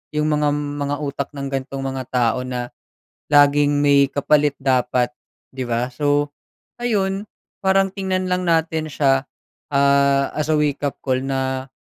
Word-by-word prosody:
'yong 150 0 +1
mgam 150 -1 +2 0.3
mga 145 0 -1
utak 140 0 -4
ng 140 -1 -4
gantong 135 0 -4
mga 135 -1 -3
tao 125 0 +1
na 125 -1 -4 0.7
laging 145 0 +5
may 140 -1 +5
kapalit 145 0 +2
dapat 125 -2 +1 0.4
'di 130 -1 -4
ba? 120 +2 -1
So 145 +2 0 0.5
ayun 200 -4 0 0.4
parang 195 0 +3
tingnan 185 -1 -1
lang 180 0 0
natin 160 -2 +1
siya 135 -2 +2 0.5
ah 140 0 +3
as 150 -1 -1
a - - +3
wake-up 145 -1 -1
call 130 -1 0
na, 130 -1 -2
140 Hz, 140 wpm, -21 LUFS, 135-150 Hz, 0.7 s, laging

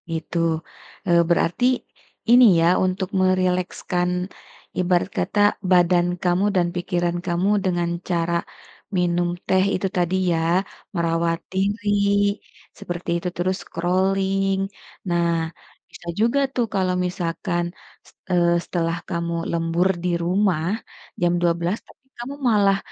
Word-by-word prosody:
Gitu, 165 +1 -4 0.7
eee, 170 -1 +5
berarti, 170 +6 +2 0.7
ini 245 +1 +8 0.2
ya 165 - +4 0.2
untuk 185 0 -2
merilekskan, 180 -1 0 0.7
ibarat 180 0 +2
kata 210 - -1 0.3
badan 175 -1 +4 0.2
kamu 180 +2 +2
dan 175 -2 +3
pikiran 175 -1 -1
kamu 175 +2 0 0.2
dengan 175 -2 0 0.2
cara, 170 -1 0 0.6
minum 175 0 +1 0.2
teh 190 0 +3
itu 190 +1 -1
tadi 175 +1 +1 0.2
ya 165 - +1 0.6
merawat 165 0 0
diri, 205 +3 0 0.9
seperti 175 0 -5
itu 180 - -4
terus 185 +2 0
scrolling, 190 +2 0 0.5
nah 170 0 +2 0.6
bisa 180 -1 -14
juga 235 +5 +3 0.2
tuh 245 - +2
kalau 185 -2 +1
misalkan, 175 0 -2 0.7
eee, 175 -1 +3
setelah 165 -1 -1
kamu 170 -1 -2 0.2
lembur 170 +2 +1 0.2
di 180 - 0
rumah, 180 -2 +1 0.6
jam 175 0 +3
12.00 170 +3 +1
teng - - -20 0.2
kamu 270 +4 -6 0.2
malah 200 -2 +4
180 Hz, 115 wpm, -22 LUFS, 170-190 Hz, 0.9 s, ini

